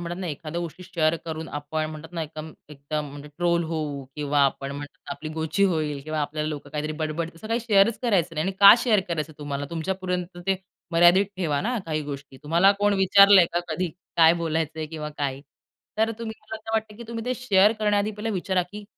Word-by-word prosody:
म्हणतात 175 +2 -5
ना, 185 - -3
एखाद्या 160 +1 -4
गोष्टी 175 +1 -7
शेअर 165 -3 +1
करून 160 0 -5
आपण 155 +2 -3
म्हणतात 155 +2 -10
ना 165 -2 -3
एकदम 155 0 -8 0.2
एकदम 150 +1 -4
म्हणजे 145 +1 -10
ट्रोल 170 -1 +2
होऊ 150 -4 -3
किंवा 145 -1 0
आपण 135 0 -1
म्हणतात 145 0 -9
आपली 155 +2 -7
गोची 160 +5 0
होईल 155 -6 0
किंवा 155 0 -2
आपल्याला 150 +1 -2
लोकं 145 -2 -6
काहीतरी 150 +1 -3
बड-बड, 160 +1 -2
असं 170 +6 -10
काही 230 +1 0
शेअरच 215 -1 +3
करायचं 185 -8 +1
नाही. 155 0 -1
आणि 195 - -1
का 200 0 +11
शेअर 220 -5 +3
करायचं 155 -2 -3
तुम्हाला? 145 -1 -4
तुमच्यापर्यंत 180 +1 -3
ते 195 0 +2 0.4
मर्यादित 175 +4 +6
ठेवा 155 -6 0
ना, 240 +4 -1
काही 155 -1 -1
गोष्टी. 140 -2 -8
तुम्हाला 170 +6 +4
कोण 205 0 +3
विचारलंय 195 -1 +7
का 175 - +1
कधी? 175 +3 -1 0.3
काय 165 -1 +7
बोलायचंय 160 -1 -2
किंवा 150 -1 -6
काय? 135 -2 -2 0.6
तर 220 +1 +3
तुम्ही 225 -1 -5
मला 220 - -7
असं 220 0 -8
वाटत 220 -1 -1
की 235 - -7
तुम्ही 230 -1 -5
ते 255 +1 -1
शेअर 210 -4 +4
करण्याआधी 210 -1 +1
पहिले 215 +1 -4
विचारा, 190 -2 0
की 205 +4 -10
165 Hz, 200 wpm, -25 LUFS, 155-195 Hz, 0.6 s, का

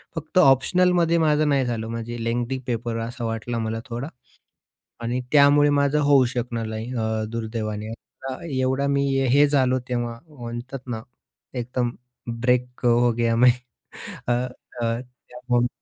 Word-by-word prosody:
फक्त 160 +3 -4
ऑप्शनलमध्ये 170 +4 +4
माझं 150 -1 +3
नाही 135 -2 +2
झालं 115 -2 -2
म्हणजे 115 0 -5
लेन्ग्थी 120 +3 -1
पेपर 115 -1 -2
असा 120 -1 -5
वाटला 115 +1 -3
मला 110 0 -2
थोडा 120 +4 -5 0.9
आणि 120 +2 -1
त्यामुळे 145 0 +6
माझं 145 +1 +2
होऊ 140 -3 +5
शकलं 120 -2 -3
नाही, 110 +3 -5
अ, 110 -1 -1
दुर्दैवाने. 110 -2 -4
एवढा 130 +5 -8
एवढा 130 +2 +1
मी 140 0 +2 0.3
हे 145 +1 +6
झालो 130 -3 +2
तेव्हा 120 -1 -2
म्हणतात 120 0 -7
ना, 110 -2 -4 0.5
एकदम 125 0 -2 0.5
ब्रेक 125 0 0
अ, - - +6
हो 120 0 +4
गया 115 -1 +2
मैं. 125 +1 +7 0.8
अ, - - +2 0.5
अ, 115 0 0 0.3
त्याहून 125 0 0
120 Hz, 140 wpm, -24 LUFS, 115-135 Hz, 0.9 s, मैं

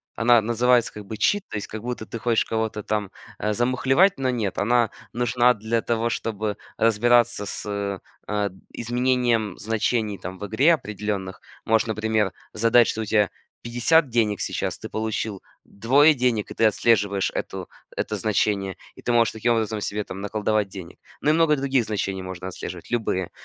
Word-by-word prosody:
она 115 0 +5
называется 120 +2 +2
как 105 -1 -9
бы 110 - -6
cheat, 205 - +2
то - - -6
есть 105 - -5
как 110 - -7
будто 120 -1 -5
ты 115 - -6
хочешь 115 -1 +1
кого-то 110 -1 -2
там, 105 -2 -2 0.3
а, 105 0 0
замухлевать, 130 - +3
но 130 -1 0
нет. 110 -6 -2
Она 120 +1 +2 0.2
нужна 120 +1 +3
для 110 +2 -1
того, 115 0 0
чтобы 110 -2 -2 0.2
разбираться 120 0 +3
с, 100 -2 -3 0.3
э, 105 -1 0 0.2
изменением 120 -3 0
значений 110 -2 -1
там 90 +1 -7
в 105 - -6
игре, 135 +11 +4
определенных. 105 - -5 0.2
Можешь, 115 +1 +2
например, 110 -2 0 0.2
задать 115 +2 +4
что 110 - -2
у - - -3
тебя 105 -1 +2 0.3
50 125 +6 +3
денег 110 -4 +1
сейчас, - - -2
ты - - -7
получил 110 -2 -3 0.2
2 140 +9 +4
денег, 125 -6 0
и - - -4
ты 115 - +2
отслеживаешь 100 -2 +2
эту - - -4 0.3
это 105 - -2
значение, 100 -1 0 0.2
и - - -14
ты - - -1
можешь 115 -1 +4
таким 115 +2 +1
образом 110 -2 -1
себе 105 +1 -2
там 95 -1 -8
наколдовать 105 0 0
денег. 95 -3 -10 0.2
Ну 150 - +3
и - - +3
много 160 -1 +4
других 135 -3 +1
значений 95 -3 -2
можно 95 0 -6
отслеживать, 90 -1 -8
любые. 105 -6 -1
110 Hz, 170 wpm, -24 LUFS, 105-120 Hz, 0.3 s, она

